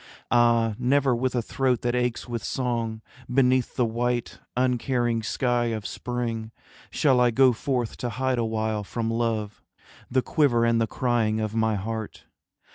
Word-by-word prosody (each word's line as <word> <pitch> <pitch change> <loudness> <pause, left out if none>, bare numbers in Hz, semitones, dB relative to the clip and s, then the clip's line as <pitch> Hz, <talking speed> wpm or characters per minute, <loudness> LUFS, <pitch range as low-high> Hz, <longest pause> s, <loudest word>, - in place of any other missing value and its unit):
Ah, 115 -2 +4
never 135 0 +2
with 130 +1 -1
a 120 - 0
throat 130 0 0
that 120 0 0
aches 125 -1 -1
with 120 -2 -4
song, 115 -4 -2 0.3
Beneath 130 -1 +2
the 125 - +2
white 120 +1 -2 0.2
uncaring 125 -2 +1
sky 120 +2 0
of 110 -3 -3
spring, 115 -2 -3 0.4
Shall 130 -4 +3
I 125 - +5
go 130 +2 +5
forth 120 -1 -2
to 120 - -3
hide 130 +1 -1
awhile 110 -2 -1
from 115 +2 -3
Love 115 -3 -2 0.5
The 130 0 +1
quiver 120 -7 +2
and 115 0 +2
the 115 - +1
crying 115 -3 0
of 110 -1 -2
my 110 -1 +1
heart. 110 +2 -5
120 Hz, 155 wpm, -25 LUFS, 115-125 Hz, 0.5 s, I